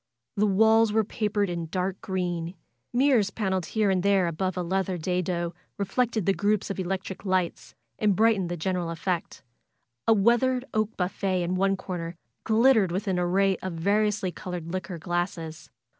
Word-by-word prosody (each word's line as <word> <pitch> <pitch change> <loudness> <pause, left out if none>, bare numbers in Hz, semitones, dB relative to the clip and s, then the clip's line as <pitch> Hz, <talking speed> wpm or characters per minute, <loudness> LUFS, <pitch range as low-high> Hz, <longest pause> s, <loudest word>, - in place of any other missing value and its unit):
The 210 +1 +2
walls 220 +2 +4
were 220 +1 +3
papered 210 -1 -1
in 170 -2 -3
dark 185 +3 -2
green. 175 -2 -3 0.4
Mirrors 245 -5 +3
paneled 190 -5 -2
here 215 -3 +1
and 185 -1 +1
there 200 -1 +3
above 185 +3 -2
a 180 - 0
leather 190 +1 -1
dado 175 0 -1 0.2
reflected 220 +1 0
the 195 - +3
groups 205 0 0
of 195 - -5
electric 190 +1 -3
lights, 185 - -1 0.2
and 205 -2 +3
brightened 215 -4 +3
the 175 - -3
general 180 0 -1
effect. 170 -1 -3 0.6
A 225 - +7
weathered 240 +4 +3
oak 215 0 -1
buffet 185 0 -1
in 175 +1 -1
one 195 +1 +2
corner 175 -3 -5 0.3
glittered 225 -4 +4
with 195 +4 -2
an 185 -2 +1
array 190 +2 +2
of 185 -1 -5
variously 200 +2 +1
col 180 +1 -7
ored 170 -2 -5
liquor 185 -1 -4
glasses. 170 -1 -3
190 Hz, 165 wpm, -27 LUFS, 175-210 Hz, 0.6 s, A